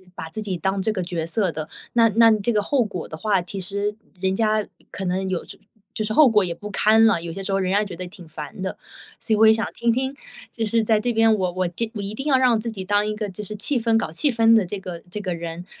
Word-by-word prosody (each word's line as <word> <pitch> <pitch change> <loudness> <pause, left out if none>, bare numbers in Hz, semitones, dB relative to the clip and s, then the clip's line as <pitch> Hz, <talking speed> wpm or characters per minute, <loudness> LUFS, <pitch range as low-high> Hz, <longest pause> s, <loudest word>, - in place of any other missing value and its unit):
把 160 - -7
自 220 - -5
己 190 -3 -2
当 190 +2 -1
这 220 - +1
个 185 - -2
角 170 -2 -3
色 190 +1 +1
的， 155 0 -6 0.2
那 230 -1 +5
那 225 +1 +6
这 215 +2 +1
个 210 - +2
后 255 +3 +1
果 180 -5 -5
的 160 - -8
话， 200 0 +1
其 190 +3 -6
实 200 +2 -2 0.3
人 190 0 +1
家 215 0 +1 0.3
可 190 - -5
能 190 +1 -1
有 185 -2 -2 0.5
就 215 - -1
是 215 - -2
后 300 +1 +7
果 210 -3 +4
也 170 - -3
不 210 - -8
堪 220 +2 +4
了， 195 -7 +3
有 170 -1 -5
些 195 - -6
时 195 - -3
候 195 - +2
人 185 0 0
家 205 +2 +3
觉 190 -4 -7
得 180 +1 -6
挺 175 -2 -13
烦 150 +3 -8
的。 190 - -4 0.4
所 225 - -3
以 - - +3
我 220 - +6
也 220 - +8
想 225 - -1
听 235 0 +1
听， 265 +3 -1 0.4
就 225 -2 -1
是 225 +1 +2
在 220 -1 +3
这 240 +2 -1
边， 225 0 +4
我 185 -3 -1
我 185 0 -1
就 220 +7 -3
我 205 - -4
一 200 +1 -5
定 270 - -5
要 265 -3 +5
让 245 -4 +3
自 230 +1 -3
己 190 -3 -6
当 205 +2 +2
一 215 - -2
个 210 -1 -3
就 200 +3 -7
是 210 +2 -6
气 255 +5 0
氛 225 -1 +2
搞 160 - -2
气 275 - +1
氛 225 -1 +4
的 210 -4 +4
这 200 +3 -5
个 180 -3 -7
这 210 - -4
个 185 -3 -3
人， 170 +1 -6
205 Hz, 310 characters per minute, -23 LUFS, 185-225 Hz, 0.5 s, 也